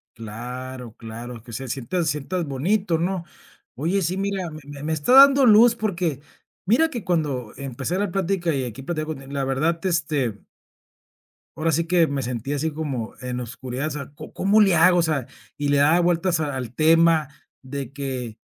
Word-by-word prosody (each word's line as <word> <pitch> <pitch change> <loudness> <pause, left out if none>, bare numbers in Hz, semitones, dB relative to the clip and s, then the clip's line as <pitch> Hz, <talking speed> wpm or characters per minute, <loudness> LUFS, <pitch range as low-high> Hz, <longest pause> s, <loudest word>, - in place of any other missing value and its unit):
Claro, 125 +2 -7
claro 115 +1 -8
que 120 - -12
se 130 +3 -5
sienta- 135 +9 -2
sientas 155 +4 -2
bonito, 165 +5 0
¿no? 180 0 -1 0.5
Oye, 175 +7 0
sí, 180 +2 -1
mira, 195 -3 -2
me 155 0 -9
me 145 0 -9
me 160 +1 -2
está 155 +10 0
dando 275 0 +8
luz 230 +2 +7
porque 175 - -2 0.5
mira 290 +11 +3
que 235 - -5
cuando 145 - -1
empecé 140 +6 -3
la 205 -2 -1
plática 185 -2 0
y 135 -3 -1
aquí 125 +2 -7
platicando 155 0 -3
contigo 135 0 -11
la 140 -1 -1
verdad 150 +6 0
este- 145 - 0 1.2
Ahora 160 +1 0
sí 165 +3 +1
que 170 -1 +4
me 140 -2 -2
sentí 125 +2 -4
así 150 +2 -1
como 140 -7 -4
en 125 -1 -4
oscuridad. 125 +3 -4
O - - -6
sea, 140 -1 -6
¿co - - -10
cómo 205 +3 +3
le 195 -4 +5
hago? 175 +2 +5
O - - +4
sea 155 -6 0 0.3
Y 145 -1 -2
le 145 - +3
daba 155 +5 +5
vueltas 175 0 +1
a 145 -3 -2
al 125 -2 -5
tema, 165 -1 +4 0.3
de 135 -1 -6
que: 130 -5 -5
150 Hz, 185 wpm, -23 LUFS, 130-175 Hz, 1.2 s, dando